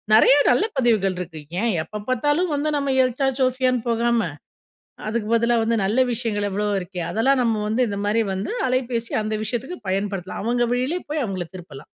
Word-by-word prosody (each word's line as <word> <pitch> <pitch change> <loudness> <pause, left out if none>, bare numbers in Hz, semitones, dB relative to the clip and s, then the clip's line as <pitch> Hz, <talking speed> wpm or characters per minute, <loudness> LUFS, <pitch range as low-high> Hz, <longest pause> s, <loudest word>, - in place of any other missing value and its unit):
நெறைய 255 +5 +7 0.2
நல்ல 245 - +3
பதிவுகள் 215 -7 +2
இருக்கு. 160 -3 -6 0.2
ஏன் 230 -2 +1
எப்ப 210 +5 -7
பார்த்தாலும் 290 +7 +1
வந்து 290 +2 0
நம்ம 280 -1 0
எல்சா 260 +2 0
ஜோஃபியான்னு 255 -2 +1
போகாம, 235 0 +2 0.9
அதுக்கு 215 -1 -2
பதிலா 235 +1 +3
வந்து 230 +1 +1
நல்ல 205 +6 0
விஷயங்கள் 220 -4 -1
எவ்வளோ 205 +1 -1
இருக்கே. 180 0 -6
அதெல்லாம் 260 +5 +2
நம்ம 220 -3 +1
வந்து 240 +3 +2
இந்த 200 -1 -3
மாரி 215 +2 +2
வந்து, 190 +1 -3 0.2
அலைபேசி 250 -2 -1
அந்த 215 0 -2
விஷயத்துக்கு 255 +10 -4
பயன்படுத்தலாம். 195 -1 -2
அவங்க 240 +1 +1
வழியிலே 255 +8 0
போய் 300 0 -1
அவங்கள 185 -4 -3
திருப்பலாம். 155 -6 -10
230 Hz, 170 wpm, -23 LUFS, 205-255 Hz, 0.9 s, நெறைய